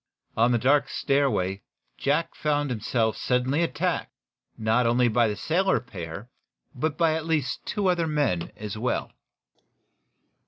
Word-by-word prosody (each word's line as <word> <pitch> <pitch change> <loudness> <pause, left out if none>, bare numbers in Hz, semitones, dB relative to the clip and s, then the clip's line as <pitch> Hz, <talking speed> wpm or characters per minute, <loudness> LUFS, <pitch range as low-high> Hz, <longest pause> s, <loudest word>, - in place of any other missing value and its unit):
On 115 +2 +3
the 120 - +3
dark 140 +5 +3
stairway 105 -9 0 0.3
Jack 150 - 0
Benson - - -21
found 145 -1 +1
himself 110 0 0
suddenly 130 +5 +1
attacked, 170 - -1 0.5
not 110 +2 +2
only 120 +1 +3
by 120 0 +3
the 105 - -2
sailor 185 - +1
pair, 90 -3 -8 0.5
but 145 +2 -2
by 165 -2 +3
at 160 0 -3
least 150 -5 -1
two 205 - -1
other 175 -2 +2
men, 145 - 0
as 105 -1 -5
well. 120 +4 -2
125 Hz, 145 wpm, -26 LUFS, 110-150 Hz, 0.5 s, On